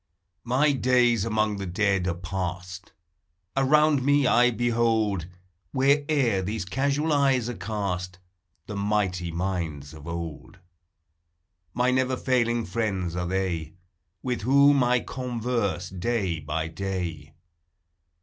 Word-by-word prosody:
My 135 Hz, +5 st, +3 dB
days 125 Hz, -4 st, +3 dB
among 110 Hz, -2 st, 0 dB
the 100 Hz, -1 st, -4 dB
dead 95 Hz, 0 st, +1 dB
are 85 Hz, -, 0 dB
passed; 90 Hz, 0 st, -5 dB, 0.6 s
Around 145 Hz, +1 st, +4 dB
me 145 Hz, +1 st, +3 dB
I 125 Hz, 0 st, +5 dB
behold, 115 Hz, -6 st, +1 dB, 0.5 s
Where'er 140 Hz, -5 st, +2 dB
these 100 Hz, +1 st, -3 dB
casual 140 Hz, +8 st, 0 dB, 0.2 s
eves 125 Hz, -3 st, +1 dB
are -, -, -3 dB
cast, 90 Hz, -3 st, -3 dB, 0.5 s
The 105 Hz, -, -6 dB
mighty 100 Hz, -4 st, -1 dB
minds 80 Hz, -5 st, -3 dB
of 75 Hz, 0 st, -11 dB
old; 85 Hz, 0 st, -6 dB, 1.2 s
My 125 Hz, +1 st, +2 dB
never 130 Hz, 0 st, +1 dB
failing 120 Hz, -3 st, +1 dB
friends 95 Hz, -4 st, -2 dB
are 90 Hz, 0 st, -2 dB
thev. 85 Hz, -4 st, -2 dB, 0.5 s
With 125 Hz, -2 st, -2 dB
whom 140 Hz, +3 st, +5 dB
I 125 Hz, 0 st, +2 dB
converse 120 Hz, -7 st, -2 dB
day 95 Hz, -2 st, -1 dB
by 80 Hz, +1 st, -3 dB
day. 85 Hz, -3 st, -5 dB
105 Hz, 115 wpm, -26 LUFS, 90-125 Hz, 1.2 s, I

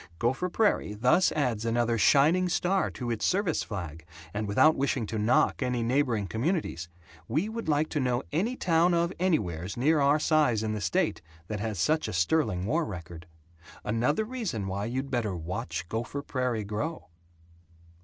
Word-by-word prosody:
Gopher 130 Hz, -, 0 dB
Prairie 200 Hz, -, +1 dB
thus 125 Hz, -, +3 dB
adds 125 Hz, -8 st, 0 dB
another 115 Hz, 0 st, +1 dB
shining 150 Hz, -, +4 dB
star 185 Hz, +2 st, +1 dB
to 120 Hz, -2 st, -5 dB
its 115 Hz, -, -3 dB
service 185 Hz, -4 st, +1 dB
flag 85 Hz, -7 st, -6 dB, 0.3 s
and 105 Hz, 0 st, -2 dB
without 155 Hz, +10 st, +4 dB
wishing 135 Hz, -3 st, 0 dB
to 110 Hz, +1 st, -4 dB
knock 110 Hz, +6 st, +2 dB
any 125 Hz, -2 st, 0 dB
neighboring 120 Hz, -4 st, +1 dB
communities, 110 Hz, -, -2 dB, 0.4 s
we 155 Hz, -, 0 dB
would 225 Hz, -5 st, -5 dB
like 150 Hz, +1 st, +2 dB
to 150 Hz, -, -1 dB
know 125 Hz, -1 st, 0 dB
any 205 Hz, -, 0 dB
town 170 Hz, -3 st, +2 dB
of 170 Hz, +1 st, +1 dB
anywheres 95 Hz, -, -1 dB
near 150 Hz, +5 st, +3 dB
our 140 Hz, +1 st, +4 dB
size 150 Hz, -8 st, +2 dB
in 110 Hz, -1 st, -1 dB
the 105 Hz, -, -4 dB
state 85 Hz, -3 st, 0 dB, 0.3 s
that 105 Hz, -1 st, -3 dB
has 105 Hz, -1 st, -3 dB
such 155 Hz, -, +1 dB
a -, -, -5 dB
sterling 90 Hz, -, +1 dB
war 160 Hz, +10 st, +1 dB
record. 85 Hz, -, -8 dB, 0.6 s
Another 125 Hz, -, 0 dB
reason 215 Hz, -, -3 dB
why 95 Hz, +2 st, -3 dB
you'd 130 Hz, +4 st, -3 dB
better 115 Hz, -7 st, -1 dB
Watch 85 Hz, -1 st, -4 dB
Gopher 120 Hz, +7 st, -4 dB
Prairie 125 Hz, -6 st, -2 dB
Grow. 110 Hz, -, -4 dB
125 Hz, 165 wpm, -28 LUFS, 105-155 Hz, 0.6 s, shining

